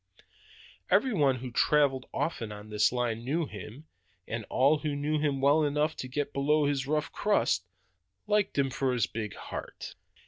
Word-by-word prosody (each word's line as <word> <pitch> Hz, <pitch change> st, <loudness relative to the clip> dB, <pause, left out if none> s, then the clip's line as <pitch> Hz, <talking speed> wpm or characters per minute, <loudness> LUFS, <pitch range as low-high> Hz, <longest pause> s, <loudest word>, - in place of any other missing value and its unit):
Every 260 Hz, -3 st, +3 dB
one 140 Hz, -8 st, +3 dB
who 125 Hz, 0 st, -6 dB
traveled 135 Hz, 0 st, +2 dB
often 115 Hz, -10 st, -2 dB
on 105 Hz, +1 st, -10 dB
that 105 Hz, 0 st, +3 dB
line 120 Hz, -2 st, -1 dB
knew 155 Hz, +6 st, 0 dB
him, 110 Hz, -, -10 dB, 0.4 s
and 115 Hz, -1 st, -4 dB
all 140 Hz, +4 st, +3 dB
who 150 Hz, -1 st, -2 dB
knew 150 Hz, +2 st, 0 dB
him 145 Hz, -3 st, 0 dB
well 145 Hz, +3 st, +4 dB
enough 150 Hz, +2 st, +1 dB
to 130 Hz, -, -5 dB
get 140 Hz, +3 st, -3 dB
below 150 Hz, +2 st, +2 dB
his 140 Hz, -2 st, 0 dB
rough 150 Hz, +1 st, 0 dB
crust, 150 Hz, -, +1 dB, 0.6 s
liked 205 Hz, -4 st, +1 dB
him 135 Hz, -1 st, +2 dB
for 130 Hz, -1 st, 0 dB
his 120 Hz, -3 st, +2 dB
big 110 Hz, -2 st, -5 dB
heart. -, -, -7 dB
140 Hz, 170 wpm, -29 LUFS, 125-150 Hz, 0.6 s, well